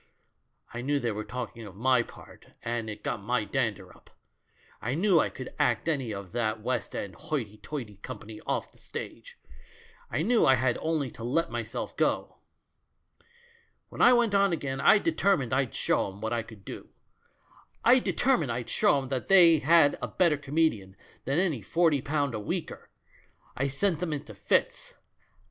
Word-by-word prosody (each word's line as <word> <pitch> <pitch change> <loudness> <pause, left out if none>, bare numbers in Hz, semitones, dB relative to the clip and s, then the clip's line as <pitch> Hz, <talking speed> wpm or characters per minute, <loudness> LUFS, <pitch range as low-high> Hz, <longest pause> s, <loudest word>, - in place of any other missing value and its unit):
I 120 - -4
knew 145 +3 0
they 120 -3 -1
were 105 0 -4
talking 120 -1 -6
of 95 - -12
my 125 +3 +3
part» - - -13
and 115 -1 -3
it 105 - -8
got - - -3
my 120 +1 0
dandei 115 -5 -2
up; - - -21 0.7
I 125 +4 -2
knew 180 0 +4
I - - +2
could 130 - -9
act 120 +5 +1
any 135 -8 0
of 100 -3 -7
that 110 -1 -1
West 120 -1 -3
End 100 -2 -4
hoity 130 - -4
toity 115 -7 -7
company 110 -1 -9
off - - -2
the - - -22
stage; - - -8 0.7
I 155 - -1
knew 235 +4 +3
I 130 - +6
had 130 -1 0
only 155 -6 -1
to 115 - -10
let 165 +8 0
myself - - -4
go. - - 0 1.5
"When - - -6
I 245 - +8
went 235 -4 +3
on 200 -1 +4
again 140 -5 -3
I 215 - +7
determined 195 - +1
I'd 130 -3 0
show - - +1
'em 95 +1 -10
what 110 +2 -2
I 120 - 0
could 105 -4 -14
do; - - -8 1.0
I 250 +2 +7
determined 245 - +1
I'd 120 0 -4
show - - +3
'em 135 -2 -4
they 165 +5 +5
had 150 0 +4
a - - -2
better 170 -4 +3
comedian 140 -10 0 0.3
than 135 +3 0
any 170 - +1
forty 160 - +2
pound 145 -2 -1
a 110 - -3
weeker. 105 - -5 0.7
I 135 - 0
sent 160 +5 0
them 170 -3 -2
into 145 - -6
fits. - - 0
130 Hz, 175 wpm, -28 LUFS, 115-160 Hz, 1.5 s, I